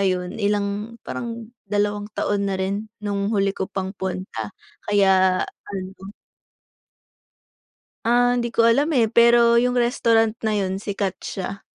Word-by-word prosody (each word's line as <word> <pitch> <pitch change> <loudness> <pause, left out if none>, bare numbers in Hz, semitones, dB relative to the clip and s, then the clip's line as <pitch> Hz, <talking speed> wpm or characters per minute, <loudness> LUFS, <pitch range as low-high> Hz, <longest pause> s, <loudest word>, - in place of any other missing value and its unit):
ayun 180 -2 0
ilang 205 +2 -1
parang 235 -1 -6 0.2
dalawang 205 0 -1
taon 200 -1 0
na 195 - -1
rin 200 +3 -3 0.2
nung 200 -1 -1
huli 200 -2 +1
ko 190 - -4
pang 190 -1 -4
punta 185 - -5 0.4
kaya 190 -2 +4
ano. 190 0 -9 2.0
Ah, 245 +1 +3
hindi 240 -1 0
ko 230 0 +2
alam 270 +6 +4
eh, 225 -2 +2
pero 235 0 +6
yung 250 0 +1
restaurant 230 -2 +3
na 215 -1 0
yun 190 -1 -1
sikat 200 -2 -2
siya. 195 +1 -5
205 Hz, 135 wpm, -22 LUFS, 195-230 Hz, 2.0 s, pero